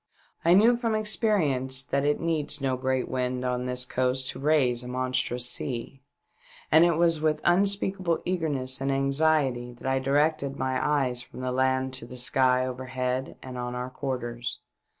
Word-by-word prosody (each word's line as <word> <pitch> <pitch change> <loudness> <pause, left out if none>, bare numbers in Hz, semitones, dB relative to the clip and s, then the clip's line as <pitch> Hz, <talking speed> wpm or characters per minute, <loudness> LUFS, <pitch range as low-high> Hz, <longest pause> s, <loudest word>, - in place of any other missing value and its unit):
I 170 +2 +5
knew 230 +5 +5
from 230 -2 -1
ex 215 0 +1
perience 135 - +1
that 140 0 0
it 145 +1 +1
needs 155 -3 0
no 135 -2 0
great 130 0 -1
wind 125 0 -2
on 125 0 -1
this 125 0 +1
coast 130 +1 -1
to - - -6
raise 135 -5 +2
a 125 - -7
monstrous 125 -1 -1
sea, 125 +1 -2 0.7
and 160 - +7
it 170 -1 +3
was 165 -1 +2
with 155 -1 +1
unspeakable 190 -1 +1
eagerness 140 -8 -1
and 135 0 0
anxiety 135 -3 +1
that 120 - -14
I 130 0 +1
directed 140 +1 0
my 130 0 -1
eyes 135 -5 0
from 125 - -11
the 130 0 -2
land 130 0 0
to 125 -2 -5
the 125 - -9
sky 125 +1 +2
overhead 130 0 -4
and 130 -1 -7
on 125 0 -4
our 125 +1 -5
quarters. 120 -3 -4
130 Hz, 170 wpm, -26 LUFS, 125-155 Hz, 0.7 s, and